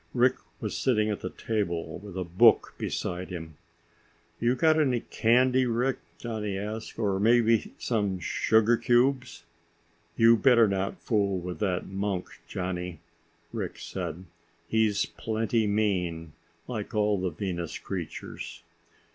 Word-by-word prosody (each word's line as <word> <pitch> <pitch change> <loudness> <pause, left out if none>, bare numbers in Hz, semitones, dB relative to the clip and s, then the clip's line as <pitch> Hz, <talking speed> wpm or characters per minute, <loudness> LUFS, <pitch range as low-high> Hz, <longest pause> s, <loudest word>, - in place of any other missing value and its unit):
Rick 125 +1 +4 0.2
was - - -3
sitting 110 -4 +2
at 105 - -3
the 90 - -4
table 85 -9 -3
with 100 -1 -9
a 95 - -1
book 95 +7 +4
beside 90 +1 -3
him. 80 -3 -7 0.8
"You 120 +2 +2
got 160 +2 +4
any 130 -6 +2
candy, 125 +2 +3
Rick?" 125 +2 0 0.2
Johnny 105 -4 -3
asked. 110 +3 -5
"Or 100 -4 0
maybe 115 +1 +3
some 100 -5 0
sugar 110 +6 +3
cubes?" 125 -1 +1 0.7
"You 115 0 +6
better 120 -2 +5
not 95 -1 -2
fool 100 -4 +1
with 90 -2 -5
that 90 -3 0
monk, 95 -1 -3
Johnny," 90 -2 -4 0.5
Rick - - -4
said. 90 +3 -5 0.4
"He's 110 -1 +2
plenty 110 0 -1
mean, 90 -7 0 0.3
like 110 -2 -5
all 105 -2 +2
the 95 - 0
Venus 85 -1 -4
creatures." 90 -5 -6
105 Hz, 130 wpm, -28 LUFS, 95-115 Hz, 0.8 s, You